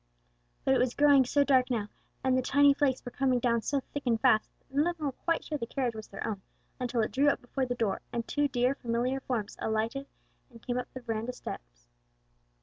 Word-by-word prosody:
But 265 Hz, -, +4 dB
it 265 Hz, -, +3 dB
was 250 Hz, -1 st, +1 dB
growing 285 Hz, -2 st, +6 dB
so 285 Hz, +3 st, +3 dB
dark 260 Hz, -2 st, +3 dB
now, 225 Hz, -5 st, -1 dB, 0.4 s
and 260 Hz, -1 st, +3 dB
the 255 Hz, -, +3 dB
tiny 285 Hz, +2 st, +5 dB
flakes 275 Hz, -2 st, 0 dB
were 245 Hz, -, -5 dB
coming 260 Hz, -1 st, +1 dB
down 235 Hz, -1 st, +1 dB
so 280 Hz, +4 st, 0 dB
thick 285 Hz, -, -2 dB
and 230 Hz, -2 st, +2 dB
fast, 220 Hz, -3 st, +3 dB
that -, -, -31 dB
none 300 Hz, +4 st, +4 dB
of 350 Hz, -1 st, -2 dB
them 310 Hz, -, -4 dB
were 280 Hz, -, 0 dB
quite 330 Hz, +5 st, -1 dB
sure 300 Hz, -2 st, -3 dB
the 230 Hz, -, -3 dB
carriage 250 Hz, -2 st, -1 dB
was 220 Hz, -1 st, -8 dB
their 195 Hz, -, -6 dB
own, 205 Hz, -3 st, -3 dB, 0.4 s
until 245 Hz, -2 st, 0 dB
it -, -, -2 dB
drew 280 Hz, +3 st, +4 dB
up -, -, 0 dB
before 255 Hz, +1 st, -3 dB
the 245 Hz, -, -2 dB
door, 220 Hz, -5 st, -1 dB
and 235 Hz, -1 st, -3 dB
two 290 Hz, 0 st, +1 dB
dear 250 Hz, -1 st, +1 dB
familiar 250 Hz, +1 st, -1 dB
forms 235 Hz, -6 st, -3 dB
alighted 225 Hz, +5 st, -1 dB, 0.4 s
and 235 Hz, -2 st, -16 dB
came 245 Hz, 0 st, -1 dB
up 250 Hz, -, -6 dB
the 260 Hz, -, -8 dB
veranda 230 Hz, +1 st, -3 dB
steps. -, -, -9 dB
250 Hz, 235 wpm, -30 LUFS, 230-275 Hz, 0.4 s, growing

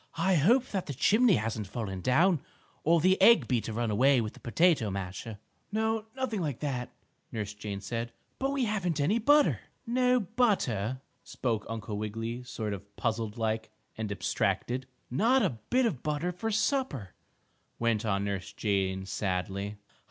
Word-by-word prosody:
"I 180 Hz, +3 st, +3 dB
hope 225 Hz, -, +4 dB
that 190 Hz, -3 st, -3 dB
the 140 Hz, -, -4 dB
chimney 215 Hz, -, +4 dB
hasn't 110 Hz, -2 st, -2 dB
fallen 95 Hz, -3 st, -4 dB
down, 155 Hz, -, +3 dB, 0.4 s
or 165 Hz, +2 st, +4 dB
the 185 Hz, +4 st, +3 dB
egg 170 Hz, -, +7 dB
beater 120 Hz, -2 st, 0 dB
run 115 Hz, 0 st, -1 dB
away 130 Hz, +5 st, +4 dB
with 110 Hz, -2 st, -2 dB
the -, -, -15 dB
potato 150 Hz, -, +2 dB
masher." 95 Hz, +3 st, -5 dB, 0.3 s
"No, 220 Hz, 0 st, 0 dB
nothing 250 Hz, -7 st, -2 dB
like 145 Hz, -7 st, -2 dB
that," 130 Hz, -4 st, -2 dB, 0.4 s
Nurse 105 Hz, -2 st, -4 dB
Jane 105 Hz, -1 st, -6 dB
said. 115 Hz, +2 st, -3 dB, 0.3 s
"But 270 Hz, -, +1 dB
we 275 Hz, -3 st, +1 dB
haven't 185 Hz, -7 st, -1 dB
any 195 Hz, +11 st, +2 dB
butter!" 290 Hz, +5 st, +4 dB, 0.3 s
"No 250 Hz, +1 st, +3 dB
butter?" 175 Hz, -, 0 dB, 0.2 s
spoke 115 Hz, -5 st, -2 dB
Uncle 110 Hz, -2 st, -4 dB
Wiggily, 115 Hz, +3 st, -4 dB
sort 110 Hz, -4 st, -4 dB
of 100 Hz, +1 st, -10 dB
puzzled 110 Hz, 0 st, -2 dB
like, 110 Hz, -1 st, -1 dB, 0.3 s
and 110 Hz, -2 st, -4 dB
abstracted. 125 Hz, +5 st, -1 dB, 0.2 s
"Not 235 Hz, -, +3 dB
a 125 Hz, -, -1 dB
bit 255 Hz, 0 st, +3 dB
of 150 Hz, -, -1 dB
butter 150 Hz, +4 st, -1 dB
for 200 Hz, +6 st, -3 dB
supper," 220 Hz, -, 0 dB, 0.6 s
went 115 Hz, -2 st, +1 dB
on 100 Hz, -3 st, 0 dB
Nurse 100 Hz, -1 st, -3 dB
Jane, 95 Hz, -2 st, 0 dB
sadly. 100 Hz, +1 st, -2 dB
125 Hz, 160 wpm, -30 LUFS, -, 0.6 s, egg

